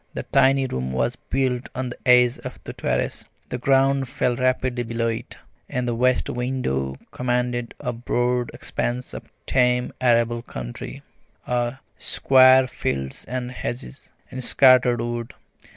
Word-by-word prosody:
The - - -3
tiny 135 0 +3
room 65 - -3
was 65 0 0
built 130 -1 -2
on 130 0 -2
the 125 - -8
edge 125 -1 +5
of - - -8
the - - -7
terrace, - - -1 0.3
the 125 - -4
ground 135 0 +2
fell 125 -3 0
rapidly 130 0 0
below 115 0 -1
it, 115 - -5 0.3
and 125 0 -2
the 120 - 0
west 125 +2 +2
window 120 - -2 0.2
commanded 125 -1 -1
a 125 -4 -3
broad 120 +1 0
expanse 120 +1 -3
of - - -9 0.2
tame 125 -1 +2
arable 120 -1 +2
country, - - -7 0.4
of 120 +1 -1 0.2
square 130 0 +5
fields 65 - -4
and 125 0 -4
hedges, 130 +2 -6 0.2
and 130 0 -4
scattered 125 -2 +5
wood. 120 0 -4
125 Hz, 140 wpm, -23 LUFS, 120-130 Hz, 0.4 s, edge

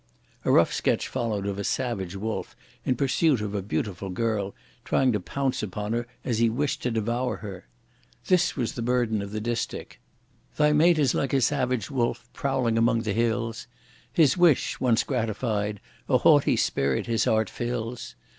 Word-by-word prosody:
A - - +3
rough - - +4
sketch - - 0
followed 115 -6 -2
of 100 0 -3
a - - -2
savage 100 -7 -2
wolf, 110 +3 -4 0.3
in 130 - +2
pursuit 140 +1 +2
of 105 -1 -4
a 100 - -1
beautiful 100 -1 -3
girl, 100 0 -1 0.3
trying 130 -1 +2
to 105 - 0
pounce 135 +7 -2
upon 105 +1 -3
her 120 0 -2 0.2
as 115 -3 0
he 115 -1 +4
wished 140 +4 -1
to 125 - 0
devour 120 +3 -1
her. 95 - -9 0.6
This 180 -2 +2
was 120 -4 -1
the 120 - -5
burden 120 -3 +1
of 100 0 -6
the 110 - -3
distich: 115 +1 -4 0.6
Thy 150 0 +4
mate 165 +3 +5
is 140 -5 +3
like 140 - -1
a 135 - +4
savage 130 -1 0
wolf 120 -2 -1
prowling 130 -5 0
among 115 0 +3
the 110 -3 -2
hills; 115 0 -1 0.4
His 155 -6 +4
wish 175 -6 +3
once 120 -3 +2
gratified 110 -4 -2 0.3
a - - +5
haughty - - +5
spirit 70 -1 0
his 115 -2 +1
heart 110 -1 +2
fills! 120 +1 -4
115 Hz, 175 wpm, -26 LUFS, 105-130 Hz, 0.6 s, mate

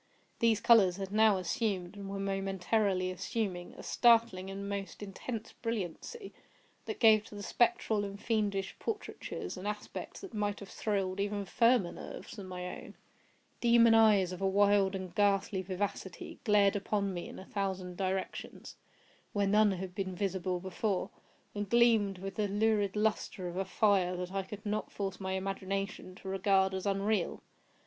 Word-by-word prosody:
These 230 -2 +3
colors 200 -7 +6
had 195 -1 -5
now 215 -1 +5
assumed, 185 +1 -2
and 200 -1 -7
were 195 - -4
momentarily 195 0 0
assuming, 185 -2 -3
a - - -9
startling 230 -6 +3
and 200 +1 -5
most 200 0 -5
intense 215 +3 -6
brilliancy, 230 - -5 0.5
that 435 - -5
gave 215 -2 +6
to 210 - -11
the 205 - -6
spectral 225 -3 +2
and 200 0 -6
fiendish 205 -4 -1
portraitures 415 - -5
an 185 +3 -5
aspect 210 0 -5
that 390 -3 -9
might 205 -1 -1
have 200 - -10
thrilled 195 -3 -1
even 205 0 -1
firmer 230 -2 +3
nerves - - -9
than 200 -4 -8
my 180 -1 -5 0.2
own. - - -12 0.6
Demon 235 -1 +6
eyes, 210 -5 +5
of 180 +1 -7
a 195 - +2
wild 200 0 +4
and 185 -2 -6
ghastly 200 -1 +2
vivacity, 190 0 -4
glared 205 -2 +4
upon 200 -1 -1
me 175 - -5
in - - -9
a 190 - -9
thousand 190 -3 -3
directions, 190 0 -4 0.6
where 205 -1 +2
none 210 0 +4
had 185 0 -5
been 190 -1 -3
visible 185 -1 -1
before, 190 +1 -2 0.4
and 205 -1 -4
gleamed 225 -4 +4
with 195 +1 -6
the 210 -1 +1
lurid 205 -1 +1
lustre 210 -3 -1
of 175 - -6
a 190 +1 -1
fire 190 -5 +2
that 180 0 -4
I 195 - 0
could 205 +3 -9
not 210 +1 -2
force 195 -2 -4
my 190 -1 -3
imagination 195 0 -3
to 190 - -11
regard 190 0 +2
as 190 +1 -3
unreal. 200 -1 0
200 Hz, 165 wpm, -32 LUFS, 190-210 Hz, 0.6 s, colors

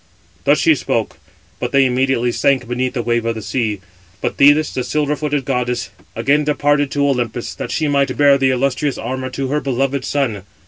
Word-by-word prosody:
Thus - - +4
she - - +4
spoke, - - -2 0.4
but 125 - -3
they 140 -1 +4
immediately 125 -1 +1
sank 130 0 +1
beneath 125 +1 -2
the 120 - -1
wave 120 0 0
of 115 0 -1
the 110 - -5
sea. 110 -6 -2 0.4
But - - -3
Thetis, 145 +2 +5
the 125 - -2
silver 150 +2 0
footed 145 -2 -2
goddess, 125 -2 -2 0.2
again 140 +6 +2
departed 145 -1 +1
to 140 +1 +1
Olympus, 120 -3 -2
that - - -6
she 155 - -1
might 140 -1 +1
bear 140 -1 +5
the 135 0 +3
illustrious 135 +2 0
armour 130 +2 -4
to 135 0 -4
her 150 +2 +1
beloved 135 0 -1
son. 130 -9 -1
135 Hz, 190 wpm, -18 LUFS, 125-145 Hz, 0.4 s, Thetis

